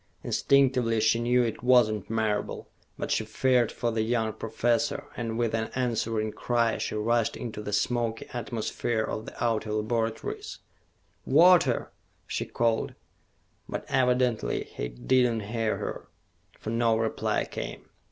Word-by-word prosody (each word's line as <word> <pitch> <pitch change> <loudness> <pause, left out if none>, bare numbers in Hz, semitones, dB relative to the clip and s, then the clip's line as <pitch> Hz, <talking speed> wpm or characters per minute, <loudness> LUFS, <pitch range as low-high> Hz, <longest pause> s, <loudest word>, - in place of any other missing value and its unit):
Instinctively 130 -5 +3
she 110 +1 +3
knew 120 +1 +3
it 115 -2 -3
was 125 -2 +6
not 110 -2 -4
Marable, 110 -2 -1 0.3
but - - -3
she - - +2
feared 125 -3 +2
for 120 - -1
the 110 -1 0
young 110 -1 0
professor, 115 +1 0
and 115 -2 -3
with 115 -2 0
an 110 0 -1
answering 115 -3 0
cry 115 0 0
she - - -3
rushed 115 +1 +1
into 110 -3 -5
the 105 - -5
smoky 115 +2 0
atmosphere 115 -1 -2
of 110 0 -4
the - - -6
outer 110 -2 0
laboratories. 110 +1 -2 0.7
"Walter!" 160 -3 +5 0.3
she - - -3
called. 115 -1 0 0.7
But - - -4
evidently 125 -2 +1
he - - -5
did 90 - +2
not 110 -3 -4
hear 115 -1 0
her, - - -5 0.5
for 110 - -5
no 115 -1 +2
reply 115 0 0
came. - - -6
115 Hz, 140 wpm, -28 LUFS, 110-120 Hz, 0.7 s, was